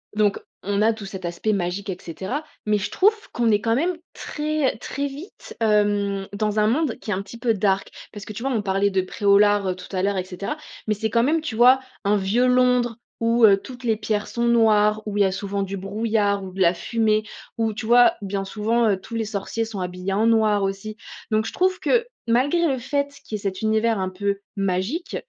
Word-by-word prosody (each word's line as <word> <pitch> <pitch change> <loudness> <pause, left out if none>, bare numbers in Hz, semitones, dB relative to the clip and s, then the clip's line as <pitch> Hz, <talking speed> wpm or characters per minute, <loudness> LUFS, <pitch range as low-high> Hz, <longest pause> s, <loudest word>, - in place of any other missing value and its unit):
donc 210 -2 +2 0.2
on 200 +1 0
a 225 +1 +4
tout 215 -2 -9
cet 190 -2 -7
aspect 175 +5 -1
magique 195 +1 -2
et 180 - -3
cetera, 190 - -5 0.2
mais 210 0 +2
je 205 0 -3
trouve 420 +3 +4 0.2
qu'on 235 -2 +2
est 205 -1 +2
quand 225 +1 +1
même 335 +6 0 0.2
très 300 -5 -2
très 280 +4 -4
vite, 290 +8 -10
hem, 205 -3 +1
dans 210 +1 -1
un 210 - +3
monde 265 +1 +1
qui 215 - -5
est - - +2
un 185 - -2
petit 215 +4 -11
peu 235 -1 +2
dark. 195 -2 0 0.2
Parce 205 -2 -8
que - - -8
tu 230 +4 -7
vois, 270 - 0
on 220 - +1
parlait 195 0 +1
de 190 -1 +2
Pré-au-Lard 200 0 +3
tout 185 - -12
à 185 - 0
l'heure 200 0 +1
et 185 - 0
cetera. 190 +9 -5 0.3
Mais 215 - +2
c'est 220 +2 -2
quand 230 +1 +2
même, 315 +5 +2
tu 310 -8 -5
vois, 250 +3 +7 0.3
un 205 +1 +3
vieux 205 +5 +2
Londres 250 -2 +3 0.2
où, 230 +1 +2
heu, 200 -2 +6
toutes 250 +5 -11
les 225 -2 +2
pierres 210 -1 -2
sont 235 - -3
noires, 215 -2 +4
où 210 -1 -3
il - - +3
y - - +7
a 190 - +1
souvent 200 +1 -3
du 195 0 -4
brouillard 205 0 0
ou 185 - -8
de 190 - -4
la 170 -1 +5
fumée, 215 +2 0 0.3
où 225 -1 0
tu 220 +2 -6
vois, 240 +2 +6
bien 195 0 -3
souvent, 225 +3 +1
heu, 200 - +2
tous 230 - -8
les 225 -1 -1
sorciers 215 +2 -3
sont 220 -3 -6
habillés 180 +1 -3
en 220 +3 +2
noir 215 -3 +3
aussi. 195 +2 -3 0.4
Donc 215 0 +2
je - - -5
trouve 370 0 +1
que 475 -1 +2 0.2
malgré 285 +9 +2
le 270 -3 0
fait 280 +3 -2
qu'il 215 - -4
y - - -11
cet 195 -2 -4
univers 220 +1 +2
un 185 -1 -1
peu 200 +1 -2 0.2
magique, 195 - -2
215 Hz, 230 wpm, -23 LUFS, 195-235 Hz, 0.4 s, vois